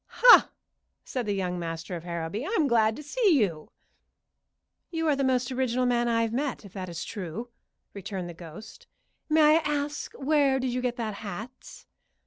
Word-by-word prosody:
"Ha!" -, -, +9 dB, 0.5 s
said 250 Hz, -4 st, -4 dB
the 205 Hz, -, 0 dB
young 180 Hz, -2 st, -2 dB
master 165 Hz, +1 st, -5 dB
of 165 Hz, -, -7 dB
Harrowby. 170 Hz, +5 st, -4 dB
"I'm 365 Hz, -2 st, +1 dB
glad 225 Hz, -3 st, +3 dB
to 300 Hz, -, -9 dB
see 380 Hz, +2 st, +2 dB
you." 170 Hz, -8 st, -1 dB, 1.2 s
"You 325 Hz, -1 st, -2 dB
are 300 Hz, -, +3 dB
the 275 Hz, -, -1 dB
most 255 Hz, -1 st, +1 dB
original 255 Hz, -1 st, 0 dB
man 240 Hz, -1 st, +2 dB
I've 230 Hz, -1 st, +1 dB
met, 265 Hz, -3 st, -2 dB
if 195 Hz, -, -13 dB
that 185 Hz, -2 st, -6 dB
is 170 Hz, 0 st, -5 dB
true," 210 Hz, +3 st, -6 dB, 0.4 s
returned 195 Hz, -2 st, -5 dB
the 175 Hz, -, -7 dB
ghost. 170 Hz, +5 st, -12 dB, 0.4 s
"May 310 Hz, 0 st, +6 dB
I -, -, +3 dB
ask 295 Hz, -1 st, -3 dB
where 280 Hz, -1 st, +2 dB
did 255 Hz, -1 st, -2 dB
you 250 Hz, -, -1 dB
get 250 Hz, -1 st, -1 dB
that 225 Hz, -3 st, -3 dB
hat?" 210 Hz, +5 st, -9 dB
235 Hz, 175 wpm, -27 LUFS, 190-275 Hz, 1.2 s, Ha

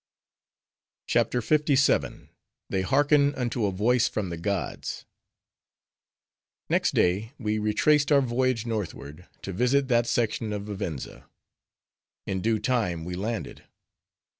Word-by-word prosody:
CHAPTER 125 Hz, -, +1 dB
LVII. 145 Hz, +1 st, +1 dB, 0.4 s
They 95 Hz, -, +1 dB
Hearken 145 Hz, +8 st, +3 dB
Unto 120 Hz, -3 st, -1 dB
A -, -, -1 dB
Voice 115 Hz, +6 st, +2 dB
From 100 Hz, -4 st, -3 dB
The 85 Hz, -, -4 dB
Gods 95 Hz, -1 st, -3 dB, 1.7 s
Next -, -, +2 dB
day 100 Hz, +7 st, +1 dB
we 110 Hz, -3 st, -1 dB
retraced 140 Hz, +8 st, +2 dB
our 140 Hz, -1 st, +6 dB
voyage 125 Hz, -2 st, 0 dB
northward, 90 Hz, -7 st, -5 dB, 0.2 s
to 95 Hz, -, -5 dB
visit 130 Hz, +6 st, +1 dB
that 120 Hz, -1 st, +3 dB
section 110 Hz, -2 st, -1 dB
of 100 Hz, -1 st, -4 dB
Vivenza. 100 Hz, -9 st, -6 dB, 1.0 s
In 95 Hz, -1 st, -2 dB
due 110 Hz, +2 st, +1 dB
time 105 Hz, -8 st, -1 dB
we 90 Hz, -, -5 dB
landed. 105 Hz, +5 st, -4 dB
110 Hz, 115 wpm, -26 LUFS, 95-130 Hz, 1.7 s, our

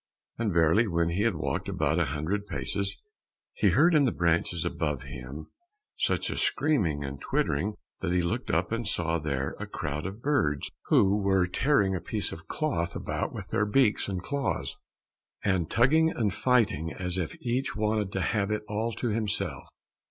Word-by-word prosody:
And 115 Hz, -3 st, +1 dB
verily 85 Hz, +7 st, +4 dB
when 85 Hz, -2 st, +1 dB
he 90 Hz, +4 st, 0 dB
had 110 Hz, -3 st, +2 dB
walked 80 Hz, -, -2 dB
about -, -, +1 dB
a -, -, +3 dB
hundred 80 Hz, +10 st, -2 dB
paces, 100 Hz, -1 st, -2 dB, 0.6 s
he 485 Hz, -, +3 dB
heard 175 Hz, +1 st, +5 dB
in 150 Hz, -3 st, +5 dB
the 125 Hz, -, +2 dB
branches 85 Hz, 0 st, +1 dB
above 75 Hz, -4 st, -2 dB
him 70 Hz, +2 st, -8 dB, 0.4 s
such -, -, 0 dB
a -, -, -4 dB
screaming 90 Hz, -, +1 dB
and 70 Hz, 0 st, -6 dB
twittering 100 Hz, +9 st, 0 dB, 0.2 s
that 90 Hz, -, -2 dB
he 90 Hz, 0 st, +2 dB
looked 85 Hz, -, -2 dB
up -, -, +1 dB
and 115 Hz, -1 st, -1 dB
saw 85 Hz, -4 st, 0 dB
there 70 Hz, -3 st, -2 dB
a -, -, -5 dB
crowd 75 Hz, +5 st, -3 dB
of 100 Hz, +4 st, -8 dB
birds 80 Hz, -, +1 dB
who 100 Hz, +1 st, +4 dB
were 95 Hz, -2 st, +3 dB
tearing 100 Hz, +1 st, +2 dB
a 90 Hz, -, -3 dB
piece 105 Hz, -2 st, -2 dB
of 80 Hz, -, -9 dB
cloth 135 Hz, -, -1 dB
about -, -, -2 dB
with -, -, -7 dB
their 105 Hz, -, +1 dB
beaks 105 Hz, -2 st, +3 dB
and 95 Hz, -2 st, -3 dB
claws, 140 Hz, +2 st, -2 dB, 0.7 s
and 95 Hz, -4 st, +1 dB
tugging 155 Hz, +7 st, +4 dB
and 110 Hz, -, 0 dB
fighting 105 Hz, -, +2 dB
as 90 Hz, 0 st, -3 dB
if 85 Hz, -, -4 dB
each 125 Hz, +2 st, -1 dB
wanted 105 Hz, -2 st, 0 dB
to 95 Hz, -, -1 dB
have 100 Hz, 0 st, 0 dB
it 105 Hz, 0 st, -1 dB
all 110 Hz, +3 st, -1 dB
to 120 Hz, -, -2 dB
himself. 105 Hz, -8 st, -2 dB
95 Hz, 180 wpm, -28 LUFS, 80-115 Hz, 0.7 s, heard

